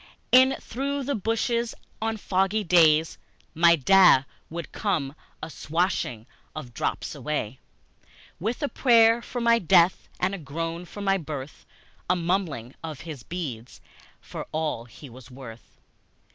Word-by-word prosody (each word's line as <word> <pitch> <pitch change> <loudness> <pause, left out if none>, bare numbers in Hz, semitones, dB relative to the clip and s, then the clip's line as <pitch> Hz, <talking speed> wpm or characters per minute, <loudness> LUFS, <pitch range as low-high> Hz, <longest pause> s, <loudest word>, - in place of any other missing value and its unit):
In 260 +1 +6
through 280 +3 -3
the 280 +2 -2
bushes, 230 +2 -1 0.3
on 225 0 -1
foggy 195 +2 0
days, 160 -3 +4 0.3
My 170 +1 +5
Da 180 -2 +6 0.3
would 170 +1 -6
come 160 -10 -1 0.3
a 155 - -5
swishing 155 - -2 0.3
of 155 - -5
the 120 - -16
drops 115 - -3
away, 135 -5 -4 0.8
With 230 - -3
a - - +2
prayer 230 -3 +4
for 245 - -6
my 235 0 +4
death 175 0 +3
and 185 +2 0
a 195 - -4
groan 165 +3 -5
for 205 - -9
my 195 -1 +1
birth, 145 -3 -8 0.4
A 180 - +4
mumbling 170 - -2
of 155 -4 -6
his 155 -6 -8
beads 130 -7 -6 0.4
for - - -8
all 155 -7 -2
he 130 +4 -13
was 125 0 -14
worth. 125 -3 -12
170 Hz, 145 wpm, -25 LUFS, 145-215 Hz, 0.8 s, In